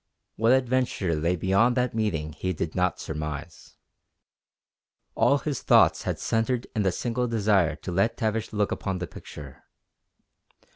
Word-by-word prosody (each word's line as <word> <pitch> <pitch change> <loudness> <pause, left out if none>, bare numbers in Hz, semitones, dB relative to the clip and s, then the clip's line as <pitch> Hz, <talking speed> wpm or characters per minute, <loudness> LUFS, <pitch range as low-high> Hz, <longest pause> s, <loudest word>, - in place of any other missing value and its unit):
What 115 +2 +3
adventure 125 -8 +1
lay 85 +3 0
beyond 100 +8 +2
that 125 -1 +1
meeting 85 -9 -2
he 95 +4 -3
did 80 -1 -4
not 90 -1 0
surmise. 75 +1 -6 1.4
All 140 - +3
his 145 -2 -3
thoughts - - +4
had - - -1
centred 115 +2 0
in 110 - +1
the 95 -2 +2
single 125 +6 -2
desire 100 -8 +2
to 80 +4 -7
let 100 +6 +1
Tavish 110 -1 -1
look 105 -1 0
upon 95 -2 -2
the 90 - -3
picture. 75 -5 -11
100 Hz, 145 wpm, -26 LUFS, 85-115 Hz, 1.4 s, thoughts